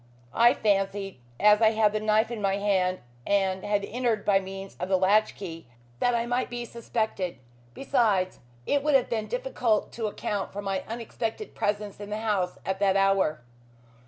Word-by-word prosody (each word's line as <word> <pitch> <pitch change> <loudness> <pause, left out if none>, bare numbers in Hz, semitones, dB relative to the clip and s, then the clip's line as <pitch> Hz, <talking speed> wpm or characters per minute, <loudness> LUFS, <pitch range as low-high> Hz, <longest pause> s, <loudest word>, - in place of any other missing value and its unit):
I 240 - +5
fancied, 195 - 0 0.2
as 210 +1 +5
I 220 0 +5
had 215 -1 +3
the 215 - 0
knife 215 +2 +2
in 230 -3 -4
my 195 -1 +1
hand 190 -3 +1 0.3
and 190 -2 +1
had 205 -1 0
entered 235 -3 -1
by 195 -1 +4
means 195 0 -8
of 180 - -3
the 190 - +4
latch 200 +4 +3
key, 165 -6 -8 0.3
that 245 -1 +2
I 235 0 0
might 245 +1 -1
be 240 0 -4
suspected. 220 -6 -3 0.4
Besides, 210 -9 +1 0.3
it 285 - +2
would 295 0 +2
have 265 - +2
been 220 -2 -1
difficult - - 0
to 225 -2 -3
account 205 -1 -3
for 205 - -4
my 195 -1 -2
unexpected 230 - -5
presence 205 -1 -2
in 205 0 -7
the 210 - -2
house 200 -5 0
at 190 0 -2
that 195 -1 +3
hour." 195 -7 +2
205 Hz, 180 wpm, -27 LUFS, 195-230 Hz, 0.4 s, I